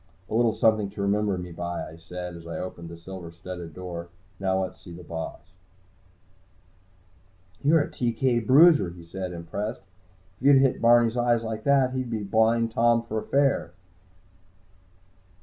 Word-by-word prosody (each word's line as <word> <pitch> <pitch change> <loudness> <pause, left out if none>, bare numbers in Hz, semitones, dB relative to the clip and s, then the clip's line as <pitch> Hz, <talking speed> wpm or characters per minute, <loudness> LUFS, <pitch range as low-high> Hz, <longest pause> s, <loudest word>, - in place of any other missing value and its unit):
"A - - -3
little 115 -1 +3
something 110 -2 +2
to 100 - -7
remember 100 -1 +1
me 90 0 -7
by," 85 +1 -4
I 80 - -11
said, 90 +1 -7
as 85 0 -11
I 85 - -5
opened 85 -2 -7
the 85 - -9
silver 90 0 -9
studded 85 -1 -9
door. 85 -2 -7 0.3
"Now 95 -1 +1
let's 95 - -7
see 85 - -12
the 85 +1 -10
boss." 80 -1 -6 2.2
"You're 155 +1 +4
a - - -6
TK 120 -1 0
bruiser," 145 - +6
he 85 -1 -12
said, 90 +2 -5
impressed. 90 +6 -5 0.6
"If 135 - +1
you 140 - +8
hit 135 -1 +3
Barney's 120 0 +5
eyes 120 -1 +2
like 110 -1 -5
that, 135 -2 +3
he's 130 -2 -3
a 110 -2 -2
Blind 110 +3 +2
Tom 115 +1 +3
for 110 -2 -3
fair." 140 -11 +1
105 Hz, 160 wpm, -26 LUFS, 90-120 Hz, 2.2 s, you